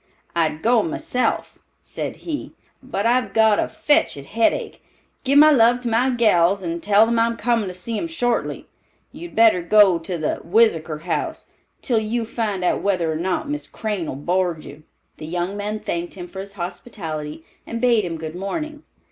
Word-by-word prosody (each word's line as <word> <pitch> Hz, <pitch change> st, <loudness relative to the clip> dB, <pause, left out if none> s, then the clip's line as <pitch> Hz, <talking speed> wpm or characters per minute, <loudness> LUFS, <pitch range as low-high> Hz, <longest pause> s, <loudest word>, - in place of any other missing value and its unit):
"I'd 160 Hz, -2 st, 0 dB
go 235 Hz, +1 st, +4 dB
myself," 320 Hz, -6 st, -2 dB, 0.2 s
said -, -, -6 dB
he, 310 Hz, -4 st, -5 dB, 0.3 s
"but 255 Hz, -6 st, -3 dB
I've 235 Hz, -4 st, +2 dB
got 220 Hz, -1 st, +4 dB
a -, -, +1 dB
fetched 295 Hz, -, +1 dB
headache. 215 Hz, +12 st, -1 dB, 0.4 s
Give 280 Hz, +1 st, +3 dB
my 305 Hz, +1 st, +8 dB
love 245 Hz, -2 st, +4 dB
to 240 Hz, -, -2 dB
my 235 Hz, +3 st, +2 dB
gals 200 Hz, -6 st, +3 dB
and 170 Hz, -1 st, -3 dB
tell 205 Hz, +3 st, +5 dB
them 230 Hz, 0 st, +1 dB
I'm 230 Hz, 0 st, +1 dB
comin' 230 Hz, -3 st, +1 dB
to 185 Hz, -, -5 dB
see 215 Hz, +5 st, -4 dB
'em 335 Hz, -, -3 dB
shortly. 245 Hz, -8 st, -2 dB, 0.4 s
You'd 345 Hz, 0 st, -10 dB
better 225 Hz, -5 st, +5 dB
go 190 Hz, 0 st, +5 dB
to 170 Hz, +2 st, -4 dB
the 155 Hz, -2 st, -2 dB
Whizzakor 165 Hz, -6 st, +2 dB
House, 170 Hz, 0 st, -3 dB, 0.3 s
till 235 Hz, -3 st, +2 dB
you 225 Hz, +2 st, -2 dB
find 215 Hz, -5 st, -2 dB
out 180 Hz, -, +1 dB
whether 180 Hz, -5 st, 0 dB
or -, -, -2 dB
not 180 Hz, -, -2 dB
Miss 295 Hz, +1 st, -4 dB
Crane 210 Hz, -7 st, -3 dB
'll -, -, -4 dB
board 175 Hz, +2 st, -1 dB
you." 145 Hz, +2 st, -11 dB, 0.4 s
The 155 Hz, -, -8 dB
young 175 Hz, +3 st, -2 dB
men 210 Hz, +1 st, -3 dB
thanked 170 Hz, -3 st, -4 dB
him 180 Hz, -2 st, -7 dB
for 190 Hz, +2 st, -9 dB
his 195 Hz, +1 st, -7 dB
hospitality, 165 Hz, -5 st, -6 dB, 0.2 s
and 230 Hz, -, -4 dB
bade 235 Hz, -3 st, +3 dB
him 170 Hz, -2 st, -4 dB
good 160 Hz, 0 st, -6 dB
morning. 300 Hz, -, -4 dB
205 Hz, 180 wpm, -22 LUFS, 175-235 Hz, 0.4 s, my